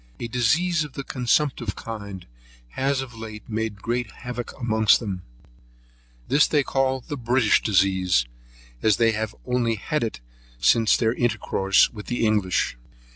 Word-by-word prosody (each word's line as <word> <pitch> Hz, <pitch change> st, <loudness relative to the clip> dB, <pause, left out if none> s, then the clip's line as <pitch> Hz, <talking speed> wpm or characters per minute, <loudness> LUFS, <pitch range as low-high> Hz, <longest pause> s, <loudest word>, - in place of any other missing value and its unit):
A 120 Hz, -, -4 dB
disease 150 Hz, +9 st, +2 dB
of 150 Hz, -3 st, -9 dB
the 140 Hz, -, -5 dB
consumptive 125 Hz, -3 st, 0 dB
kind 105 Hz, -5 st, -7 dB, 0.4 s
has 135 Hz, -, 0 dB
of 130 Hz, -3 st, -8 dB
late 110 Hz, -1 st, -9 dB
made 110 Hz, -2 st, -3 dB
great 120 Hz, -1 st, -1 dB
havoc 120 Hz, +3 st, -6 dB
amongst 110 Hz, -3 st, +3 dB
them; 100 Hz, -6 st, -4 dB, 1.1 s
this 145 Hz, +2 st, +4 dB
they 145 Hz, -2 st, +2 dB
call 130 Hz, 0 st, 0 dB
the 145 Hz, -, -6 dB
British 120 Hz, -2 st, +3 dB
disease, 95 Hz, -, +2 dB, 0.6 s
as 105 Hz, -3 st, +3 dB
they 115 Hz, -1 st, +4 dB
have 110 Hz, -1 st, -3 dB
only 125 Hz, -2 st, +1 dB
had 150 Hz, +8 st, -2 dB
it 110 Hz, -, -3 dB, 0.4 s
since 110 Hz, -, +4 dB
their 115 Hz, -1 st, +1 dB
intercourse 115 Hz, -5 st, +2 dB
with 105 Hz, -2 st, -9 dB
the 120 Hz, -2 st, 0 dB
English. 105 Hz, -, +1 dB
115 Hz, 145 wpm, -24 LUFS, 105-125 Hz, 1.1 s, this